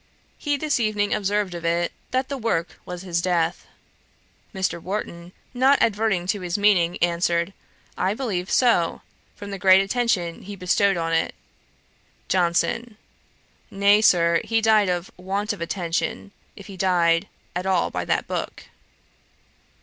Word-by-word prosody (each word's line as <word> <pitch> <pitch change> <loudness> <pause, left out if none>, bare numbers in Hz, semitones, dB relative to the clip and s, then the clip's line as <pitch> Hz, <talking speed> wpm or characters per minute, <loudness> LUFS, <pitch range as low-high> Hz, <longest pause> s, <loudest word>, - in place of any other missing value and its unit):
He 290 -1 0
this 295 -2 0
evening 210 -2 0
observed 205 -2 0
of 170 -1 -7
it, 170 +1 0 0.2
'That 260 +2 -1
work 175 -7 -2
was 180 0 -6
his 170 -3 -1
death.' 170 -1 0 0.8
Mr. 190 -3 -2
Warton, 175 -3 -5 0.2
not 265 +3 +4
adverting 210 -4 +1
to 195 +2 -1
his 180 +2 -2
meaning, 190 -4 +3
answered, 170 +1 +1 0.5
'I 195 +3 +1
believe 195 -8 -3
so; 230 -10 +2 0.3
from 205 0 -8
the 195 - -5
great 190 0 +6
attention 195 -5 0
he 205 +1 -8
bestowed 195 +1 +2
on 165 -1 -1
it.' 165 - 0 0.9
JOHNSON. 190 +6 0 0.7
'Nay, 200 +1 +4
Sir, 170 -5 +4
he 225 0 +1
died 215 -3 +3
of 175 0 -2
want 200 +4 -2
of 195 - -10
attention, 170 +2 -3 0.2
if 200 - -12
he 195 -2 -10
died 175 -2 +2 0.3
at 180 +2 -2
all 185 -2 +1
by - - -3
that - - 0
book.' - - -5
190 Hz, 140 wpm, -23 LUFS, 175-210 Hz, 0.9 s, great